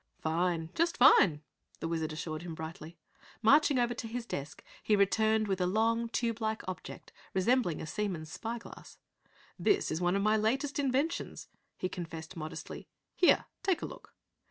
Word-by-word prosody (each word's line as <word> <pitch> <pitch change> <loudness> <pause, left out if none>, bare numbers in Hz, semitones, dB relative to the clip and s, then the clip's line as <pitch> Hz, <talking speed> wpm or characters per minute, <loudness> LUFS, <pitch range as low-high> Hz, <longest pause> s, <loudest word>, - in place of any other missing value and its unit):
"Fine, 165 0 -1
just 335 +1 +1
fine!" 180 - +6 0.4
The - - -3
Wizard 160 -1 -2
assured 155 0 -4
him 170 -2 -6
brightly. 160 +1 -8 0.5
Marching 290 +4 +5
over 240 -1 +2
to 230 - -5
his 235 +1 -4
desk, 145 -9 -6 0.2
he 215 - +3
returned 215 +2 +3
with 190 -2 -1
a 180 - +2
long, 230 +4 +1
tube 230 -1 -1
like 220 -2 -2
object 185 - -7 0.2
resembling 190 -3 +2
a - - -5
seaman's 170 -4 -3
spy 230 +6 -4
glass. 235 - -12 0.6
"This 405 - +2
is 160 +2 -2
one 175 +1 +2
of 200 - +1
my 215 +1 +4
latest 270 +7 0
inventions," 280 +4 -1 0.3
he 185 - -1
confessed 165 -1 -7
modestly. 155 -1 -7 0.3
"Here, 355 - +4 0.2
take 380 -3 0
a - - 0
look." - - -11
205 Hz, 165 wpm, -31 LUFS, 165-235 Hz, 0.6 s, fine